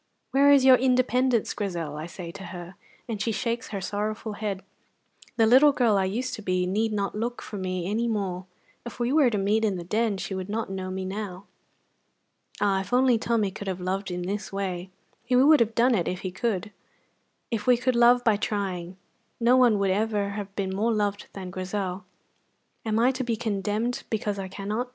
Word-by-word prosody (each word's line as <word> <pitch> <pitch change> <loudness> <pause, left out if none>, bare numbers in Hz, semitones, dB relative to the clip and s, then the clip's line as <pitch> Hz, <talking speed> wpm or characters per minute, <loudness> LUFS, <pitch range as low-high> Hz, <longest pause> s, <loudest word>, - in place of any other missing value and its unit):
'Where 280 +1 +5
is 275 -2 +6
your 260 -1 +8
independence, 255 -2 +2
Grizel?' 170 -7 -3
I 155 +2 -5
say 175 -1 -8
to 195 +1 -9
her, 175 0 -8 0.3
and 220 -4 -4
she 225 - 0
shakes 235 +3 -2
her 200 - -4
sorrowful 210 +2 -3
head. 205 -3 -4 0.7
The 225 - +5
little 265 +6 +7
girl 240 -6 +2
I 195 -1 +2
used 235 +7 -2
to - - -5
be 185 -2 0
need 215 +4 0
not 200 -2 -1
look 235 +3 -3
for 210 - -7
me 185 -1 -3
any 225 +4 0
more; 190 -5 -2 0.4
if 240 - -9
we 240 +2 0
were 295 -5 +5
to 215 - -1
meet 205 +3 +1
in 205 -4 +1
the 175 - -5
Den 215 +3 0
she 190 - -5
would 190 0 -4
not 220 -1 -3
know 190 -1 -4
me 190 0 -4
now." 195 -1 -5 1.1
Ah, 195 -1 +2
if 195 - -9
only 250 -2 +4
Tommy 225 -4 0
could 200 +1 -8
have 185 -1 -2
loved 190 +2 -2
in 180 0 -3
this 200 +2 -4
way! 190 -2 -3 0.3
He 250 +1 0
would 285 +4 +6
have 225 -1 +1
done 245 +2 +4
it 185 -7 +1
if 180 0 -3
he 185 - -4
could. 210 +1 -2 0.8
If 225 -1 -2
we 250 -1 +6
could 250 +1 0
love 240 +1 +5
by 220 -3 +3
trying, 190 -4 -3 0.4
no 240 +2 +4
one 245 -4 +5
would 200 -1 +1
ever 205 0 0
have 200 -1 -6
been 190 -2 -2
more 220 +4 +1
loved 205 -2 -1
than 185 -2 -7
Grizel. 185 0 -4 0.8
"Am 220 -2 0
I 240 +3 +4
to 260 0 -3
be 235 -2 -1
condemned 220 +1 -2
because 210 -2 -2
I 190 - -4
cannot?" 210 +6 -4
210 Hz, 205 wpm, -26 LUFS, 190-235 Hz, 1.1 s, your